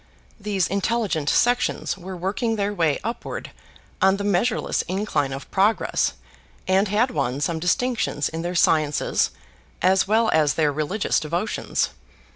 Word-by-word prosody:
These 200 -3 0
intelligent 200 -5 0
sections 245 +1 +1
were 185 0 -8
working 210 +6 -1
their 205 -1 -1
way 165 -6 +1
upward 230 +3 -5 0.5
on 190 0 +4
the 200 - -4
measureless 205 +4 +1
incline 185 -7 -1
of 135 +1 -7
progress 205 +3 +2 0.5
and 190 +2 +3
had 220 +6 +1
won 135 -2 -1
some 160 +3 -1
distinctions 180 - 0
in 165 +1 -5
their 175 +1 -3
sciences, 155 -3 +2 0.5
as 190 +1 +3
well 220 +2 +3
as 150 -3 +3
their 155 -2 +2
religious 155 +8 0
devotions. 170 +7 -1
190 Hz, 135 wpm, -23 LUFS, 160-210 Hz, 0.5 s, on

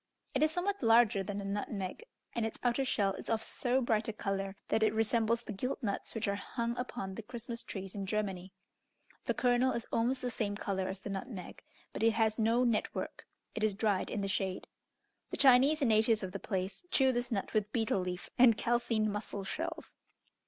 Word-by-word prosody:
It - - +1
is 310 - +5
somewhat 385 +4 -1
larger 225 -4 +5
than 200 +1 -4
a - - -6
nutmeg, 200 - -3 0.3
and 235 - -1
its 225 - -3
outer 245 +2 +2
shell 200 -6 +1
is - - -8
of 225 -1 +1
so 255 +1 0
bright 220 -3 +1
a 225 - -2
colour, 195 -1 -2
that 220 - +2
it 215 0 +3
resembles 225 +1 +2
the 215 - -6
gilt 250 +7 -3
nuts 200 +1 -2
which 225 -1 -1
are 200 - +1
hung 235 +3 -3
upon 245 -6 -4
the 225 - -6
Christmas 235 +1 -6
trees 195 -2 -6
in 195 -2 -4
Germany. 195 -3 -2 0.7
The - - 0
kernel 250 +1 +3
is 235 - -3
almost 250 +3 +1
the 250 - -1
same 205 -3 -2
colour 190 -3 -2
as 190 0 -4
the 200 - -5
nutmeg, 195 -2 -6 0.3
but - - -4
it 225 0 +4
has 220 0 +1
no 230 +3 +3
net 235 -3 +1
work: - - -5 0.3
it 215 - -3
is 215 -2 +2
dried 205 -2 +1
in 210 - -2
the 195 - -1
shade. 190 -1 -1 0.6
The - - -4
Chinese 275 +3 +6
and 250 - +3
natives 220 0 +4
of 185 - -4
the 200 - -5
place 190 - -3
chew 265 -5 +4
this 245 0 -2
nut 200 -4 -2
with 215 -1 +1
betel 225 -4 +1
leaf 180 0 -4
and 235 -3 +7
calcined 230 -3 +1
mussel 205 -1 -4
shells. 330 - -5
220 Hz, 210 wpm, -33 LUFS, 200-240 Hz, 0.7 s, and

